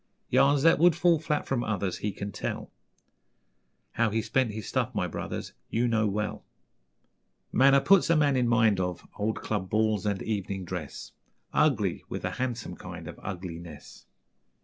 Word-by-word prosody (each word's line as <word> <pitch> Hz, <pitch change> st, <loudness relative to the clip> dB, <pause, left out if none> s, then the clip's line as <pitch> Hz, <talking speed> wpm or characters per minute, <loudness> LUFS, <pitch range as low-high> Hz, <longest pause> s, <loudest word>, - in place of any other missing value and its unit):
Yarns 140 Hz, 0 st, +4 dB
that 165 Hz, -3 st, +5 dB
would 175 Hz, 0 st, +6 dB
fall 170 Hz, -2 st, +3 dB
flat 150 Hz, -1 st, -1 dB
from 125 Hz, -3 st, -1 dB
others 100 Hz, -4 st, -2 dB
He 105 Hz, -, -2 dB
can 100 Hz, +1 st, -6 dB
tell; -, -, -5 dB, 1.2 s
How 115 Hz, -1 st, +1 dB
he 110 Hz, +1 st, -1 dB
spent 130 Hz, 0 st, +1 dB
his 105 Hz, 0 st, -6 dB
'stuff', -, -, -1 dB
my -, -, +1 dB
brothers, -, -, -5 dB, 0.2 s
You 120 Hz, +2 st, +1 dB
know 110 Hz, -2 st, +2 dB
well. 105 Hz, +1 st, -3 dB, 1.1 s
Manner 135 Hz, +1 st, +5 dB
puts 195 Hz, +1 st, +5 dB
a 165 Hz, -, +5 dB
man 145 Hz, -3 st, +3 dB
in 125 Hz, -2 st, +2 dB
mind 110 Hz, -4 st, +3 dB
of 90 Hz, -1 st, -3 dB
Old 110 Hz, +2 st, -1 dB
club 100 Hz, -4 st, -2 dB
balls 110 Hz, -1 st, +1 dB
and 100 Hz, -2 st, -1 dB
evening 100 Hz, -3 st, -3 dB
dress, 85 Hz, -5 st, -6 dB, 0.4 s
Ugly -, -, +2 dB
with -, -, -4 dB
a -, -, -1 dB
handsome 120 Hz, -7 st, -3 dB
kind 90 Hz, -2 st, -9 dB
of 80 Hz, -, -9 dB
Ugliness. 85 Hz, -4 st, -8 dB
110 Hz, 165 wpm, -28 LUFS, 95-130 Hz, 1.2 s, would